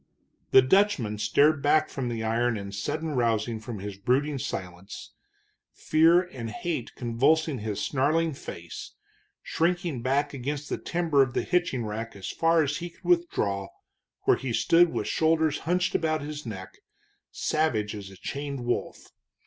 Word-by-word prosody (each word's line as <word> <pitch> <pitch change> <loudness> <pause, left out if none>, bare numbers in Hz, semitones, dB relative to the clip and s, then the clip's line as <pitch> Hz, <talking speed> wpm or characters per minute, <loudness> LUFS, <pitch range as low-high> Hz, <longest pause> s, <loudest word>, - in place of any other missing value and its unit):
The 130 - +7
Dutchman 130 - +2
started 145 +6 +3
back 155 +2 +3
from 130 -3 -4
the 115 -1 -3
iron 115 +1 +1
in 100 -1 -6
sudden 150 +11 -3
rousing 115 -3 0
from 110 0 -7
his 100 0 -6
brooding 135 +6 +1
silence, 90 -3 -6 0.6
fear 165 +3 +4
and 125 -10 -7
hate 130 +2 -4
convulsing 135 +5 +1
his 105 -1 -3
snarling 155 +4 +1
face, 85 -9 -8 0.5
shrinking 170 -5 0
back 140 +4 0
against 140 +2 -4
the - - -2
timber 165 -5 +1
of 130 -2 +1
the - - +1
hitching 175 -10 0
rack 110 +2 -5
as 95 -1 -6
far 165 -1 +3
as 145 0 -1
he 175 - -5
could 170 - -25
withdraw, 105 - +1 0.6
where - - +4
he 130 -3 -4
stood 170 +8 +4
with - - -2
shoulders 160 -1 +2
hunched 180 +1 +1
about 155 -2 0
his 150 -2 -6
neck, 95 -4 -8 0.5
savage 115 -10 0
as 100 -2 -7
a 95 - -13
chained 140 0 -5
wolf. 120 - -3
135 Hz, 155 wpm, -27 LUFS, 110-160 Hz, 0.6 s, The